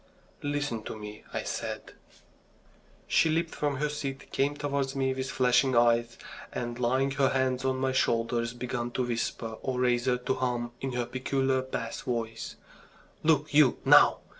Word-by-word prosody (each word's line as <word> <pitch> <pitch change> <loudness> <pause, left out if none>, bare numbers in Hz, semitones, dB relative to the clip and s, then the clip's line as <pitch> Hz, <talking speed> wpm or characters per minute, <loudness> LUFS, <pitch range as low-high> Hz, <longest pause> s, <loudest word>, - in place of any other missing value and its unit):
"Listen 145 -5 -2
to - - -5
me," 105 0 -9
I - - -3
said. - - -5 1.1
She 165 - +3
leaped 165 +1 0
from 145 -1 -1
her 150 +3 0
seat, 140 -2 -5
came 140 +2 +1
towards 140 -2 -1
me 135 -1 +1
with 130 0 -3
flashing 130 0 +3
eyes, 120 0 +3 0.3
and 120 0 -4
laying 130 +3 +2
her 135 0 +2
hands 130 -1 0
on 130 0 +1
my 130 0 0
shoulders, 115 -2 +1
began 120 -1 -3
to 130 - 0
whisper, 115 -1 -3
or 130 -1 -2
rather 125 0 +2
to 125 +1 -1
hum 120 -2 -2
in 135 -1 -3
her 120 -1 -1
peculiar 130 +1 0
bass 130 -3 -4
voice: 115 -2 -4 0.7
"Look 150 -1 +2
you, 145 -4 +5
now! - - +7
130 Hz, 160 wpm, -29 LUFS, 120-135 Hz, 1.1 s, now